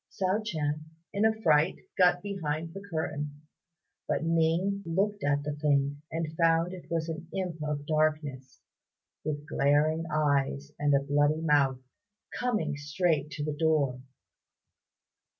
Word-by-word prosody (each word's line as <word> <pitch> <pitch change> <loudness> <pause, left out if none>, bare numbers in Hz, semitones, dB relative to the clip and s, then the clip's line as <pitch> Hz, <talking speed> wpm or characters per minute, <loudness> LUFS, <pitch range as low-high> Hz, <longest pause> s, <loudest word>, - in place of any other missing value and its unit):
Hsiao 195 +2 0
ch'ien 155 -7 -2 0.3
in 205 +2 +2
a 220 0 +2
fright 155 +1 +4 0.2
got 180 -1 +4
behind 165 -5 -3
the 195 - -7
curtain; 150 -3 -3 0.6
but - - 0
Ning 165 +4 +1
looked 200 +5 -1
at 145 0 +1
the 150 0 -2
thing, 145 -1 +1
and 160 -1 -3
found 165 +1 +3
it 180 - -10
was 165 -1 -1
an 165 +1 -5
imp 180 -4 -3
of 150 -1 -2
darkness, 155 -4 -1 0.6
with 150 -1 -3
glaring 155 +3 +2
eyes 145 -1 +1
and 145 -1 +3
a 140 - +2
bloody 145 +2 +2
mouth, 140 -5 +3 0.5
coming 215 -12 -1
straight 150 0 0
to 150 0 -5
the 150 - -1
door. 145 -5 +1
155 Hz, 135 wpm, -29 LUFS, 145-170 Hz, 0.6 s, fright